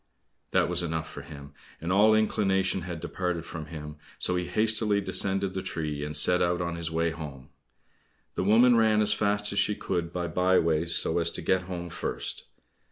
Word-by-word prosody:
That - - +2
was 90 0 0
enough 80 -2 -3
for - - -9
him, 70 0 -11 0.3
and 85 +3 -3
all 105 +3 +5
inclination 95 -3 +1
had 85 -2 -6
departed 90 -2 -3
from 80 -2 -7
him, 75 -1 -8 0.2
so 90 - +2
he 90 0 -1
hastily 110 +2 +1
descended 95 -1 0
the 95 - -3
tree, 75 -5 -4
and 75 +1 -1
set 90 0 +4
out 85 0 +1
on 85 -1 -2
his 85 -1 -3
way 85 +1 0
home. 70 -5 -9 0.8
The - - -2
woman 115 +5 +5
ran 110 -2 +4
as 105 0 +3
fast 105 0 0
as 100 - +1
she 105 - +1
could 85 -4 -3
by 90 0 -3
by 90 +3 +2
ways 80 +1 +1
so 80 - +2
as 85 0 +2
to - - -5
get 95 -1 +1
home 85 -2 -5
first. - - -4
90 Hz, 195 wpm, -27 LUFS, 80-100 Hz, 0.8 s, all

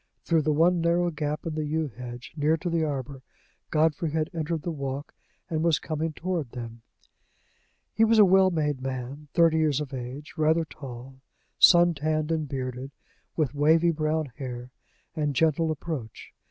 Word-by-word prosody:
Through 165 -2 +2
the 155 - +1
one 170 +3 +3
narrow 170 +1 +2
gap 150 -1 -3
in 165 - -3
the 155 0 -2
yew 155 +1 -1
hedge, 125 +2 -9
near 155 +1 +2
to 175 +2 -4
the 165 -1 +1
arbor, 140 -2 -4 0.5
Godfrey 155 +1 +1
had 155 +1 -1
entered 160 -1 -2
the 170 - -2
walk, 140 -1 -5 0.3
and 155 -1 -1
was 165 -3 +3
coming 160 0 -3
toward 165 -5 -3
them. 115 -2 -7 1.1
He 220 - +3
was 225 0 +4
a 210 - +8
well 190 0 +5
made 150 -6 -1
man, 135 +3 -5
thirty 165 -2 +4
years 150 -3 +2
of 145 -2 -5
age, 130 +4 -7
rather 160 +1 +2
tall, 130 -2 -10 0.4
sun 175 -1 +7
tanned, 155 +1 -1
and 155 -3 -1
bearded, 130 0 -4 0.5
with 150 -5 0
wavy 160 +4 +4
brown 155 -2 -1
hair, 125 -2 -6 0.4
and 150 -3 -1
gentle 160 +2 +2
approach. 150 -7 -5
155 Hz, 165 wpm, -27 LUFS, 135-165 Hz, 1.1 s, a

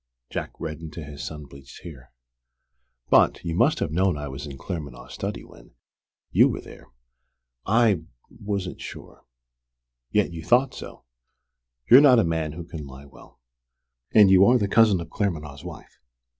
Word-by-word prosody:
Jack - - -5
reddened 80 0 -7
to 85 - -7
his 70 -1 -9
sun 75 -2 -7
bleached 70 -1 -14
hair. 70 -7 -12 1.0
"But - - +4
you 85 - -2
must 120 - +2
have 75 - -2
known 90 0 +1
I 75 0 -6
was 70 +3 -7
in 70 -2 -9
Claremanagh's 75 -6 -7
study - - -5
when - - -18 0.6
you - - +5
were - - -4
there." - - -14 0.8
"I 105 -6 +2 0.2
wasn't 100 -3 -5
sure." - - -11 0.8
"Yet 105 -4 0
you 80 -1 -7
thought 125 - +3
so! - - -10 0.8
You're 130 +3 +9
not 135 -4 +6
a 115 - +4
man 80 -2 -2
who 85 +2 -7
can 80 -3 -9
lie 65 +1 -12
well. 70 - -18 0.7
And 105 -3 +6
you 95 0 +7
are 125 +3 +5
the 105 -4 0
cousin 105 -2 +4
of 85 - -10
Claremanagh's 75 -8 -3
wife. 90 -3 -11
85 Hz, 160 wpm, -24 LUFS, 75-100 Hz, 1.0 s, You're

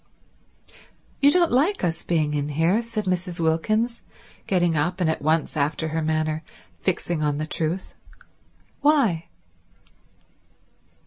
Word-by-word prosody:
"You 285 - +6
don't 345 +2 +3
like 310 +11 +2
us 165 -2 -1
being 155 -3 0
in 145 0 -1
here," 165 +9 +2
said 225 -3 -4
Mrs. 180 -1 -2
Wilkins, 215 +9 0 0.5
getting 175 -3 +2
up 175 +5 0
and 175 - +2
at - - -4
once, 155 +2 +1
after 155 +2 0
her 160 +1 -1
manner, 155 0 0 0.4
fixing 165 - -1
on 150 -1 0
the 155 - -2
truth. 165 +2 -3 0.9
"Why?" 265 - +3
170 Hz, 125 wpm, -24 LUFS, 155-215 Hz, 0.9 s, You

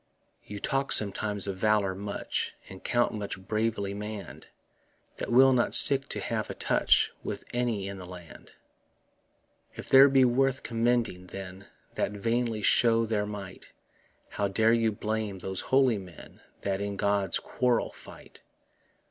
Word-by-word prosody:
You 105 0 -8
talk 135 +5 -1
sometimes 105 0 +1
of 95 -1 -4
valour 105 -2 +2
much, 100 +2 -3
And 95 - -12
count 120 -3 0
such 100 -1 -5
bravely 110 -2 -1
mann'd 105 0 -7 0.7
That - - -4
will 130 +2 +6
not 120 -1 +2
stick 135 0 +4
to - - -4
have - - -3
a - - -5
touch - - +2
With - - -5
any 120 -5 -1
in 100 -1 -7
the 90 - -9
land. 90 -2 -12 1.2
If - - -9
these 135 +1 +8
be 135 -1 +5
worth 135 +2 +1
commending, 115 -5 0
then, 95 +1 -9 0.3
That - - -2
vainly 115 +1 -1
show 115 +1 +4
their 105 -2 -1
might, 100 -2 -9 0.6
How 100 - -1
dare 110 +3 +3
you 115 -1 +2
blame 105 -1 -3
those 95 +1 -5
holy 130 -5 +2
men 90 -4 -13 0.2
That 100 0 -2
in 100 0 -3
God's 100 -2 +1
quarrel 125 -2 0
fight? - - -14
105 Hz, 150 wpm, -28 LUFS, 100-120 Hz, 1.2 s, these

